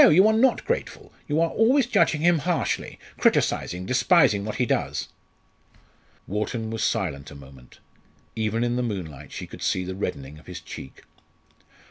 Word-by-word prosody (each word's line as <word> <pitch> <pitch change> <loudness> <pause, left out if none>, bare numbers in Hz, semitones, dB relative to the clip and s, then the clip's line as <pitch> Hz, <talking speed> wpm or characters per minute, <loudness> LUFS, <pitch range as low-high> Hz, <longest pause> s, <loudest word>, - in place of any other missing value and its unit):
you 185 +6 +6
are 220 - +4
not 245 +3 +3
grateful; - - -3
you 150 +1 +1
are 165 0 +2
always 250 +5 +3
judging 155 -9 +2
him 170 -1 +4
harshly 170 +3 -1 0.2
criticising, 90 +1 +1
despising 130 - +4
what 105 +1 -4
he 125 - +1
does." - - -1 1.2
Wharton 110 +3 -3
was 115 -1 -2
silent 70 -9 -1
a - - -12
moment. 65 -2 -15 0.6
Even 110 +1 0
in 120 0 0
the - - +1
moonlight 95 - -5
she - - -6
could - - -12
see 90 - 0
the 95 +1 -5
reddening 75 -6 -5
of - - -20
his - - -7
cheek. 65 - -10
110 Hz, 160 wpm, -25 LUFS, -, 1.2 s, you